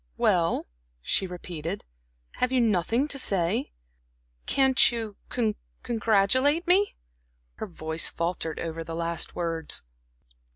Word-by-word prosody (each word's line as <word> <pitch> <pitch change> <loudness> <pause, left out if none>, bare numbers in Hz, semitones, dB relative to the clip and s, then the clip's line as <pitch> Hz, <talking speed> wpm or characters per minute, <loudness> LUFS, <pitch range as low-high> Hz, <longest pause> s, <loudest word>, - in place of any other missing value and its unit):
"Well," - - +2 0.4
she 190 - +1
repeated, 175 0 -6 0.5
"have 250 - +1
you 260 - +3
nothing 230 - +2
to 275 - 0
say? 175 - +1 0.8
Can't 265 -2 +5
you 225 -3 -4 0.7
congratulate 240 - +2
me?" 385 +3 +4 0.6
Her - - -5
voice 160 -2 0
faltered 165 -2 -3
over 165 0 -4
the 165 0 -6
last 170 0 -1
words. 165 -2 -2
195 Hz, 110 wpm, -27 LUFS, 165-250 Hz, 0.8 s, Can't